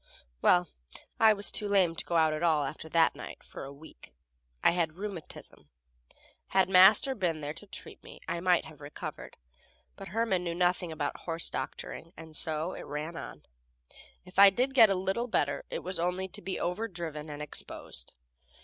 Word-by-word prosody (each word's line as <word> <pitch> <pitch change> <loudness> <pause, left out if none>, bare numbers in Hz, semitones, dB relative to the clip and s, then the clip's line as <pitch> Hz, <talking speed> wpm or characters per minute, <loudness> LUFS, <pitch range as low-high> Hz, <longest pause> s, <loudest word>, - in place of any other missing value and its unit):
Well, 180 -1 +4 0.5
I 220 -1 +7
was 205 -1 0
too 210 - -2
lame 190 -5 +3
to - - -4
get 170 - 0
out 160 -1 +4
at 155 - -3
all, 160 -4 +3
after 155 +3 -6
that 165 0 +4
night, - - -9
for - - -9
a 135 - -8
week. 145 +3 -14 0.5
I - - +6
had 170 -3 0
rheumatism. 175 - -9 0.8
Had 190 -1 +2
Master 195 +8 +7
been 175 -9 -1
there 145 +1 -4
to 205 - -10
treat - - -6
me, - - -12
I 170 - -2
might 180 0 +3
have 155 -1 -13
recovered, 145 +1 -8 0.6
but - - -9
Herman 195 -2 0
knew 170 -1 -3
nothing 175 -1 +1
about 160 - -3
horse 165 -1 -1
doctoring, 165 +2 -6
and 160 -1 -11
so 160 +3 -1
it - - -7
ran 150 +3 -4
on. - - -8 0.8
If 180 +1 -4
I 200 0 +11
did 250 +7 0
get 230 -5 +8
a 195 - +2
little 190 +6 -1
better, 145 -11 0
it - - -4
was 185 0 -4
only 180 +2 -1
to - - -7
be 190 +2 -4
overdriven 175 -6 -3
and 145 0 -7
exposed. 150 - -4
175 Hz, 185 wpm, -30 LUFS, 160-190 Hz, 0.8 s, I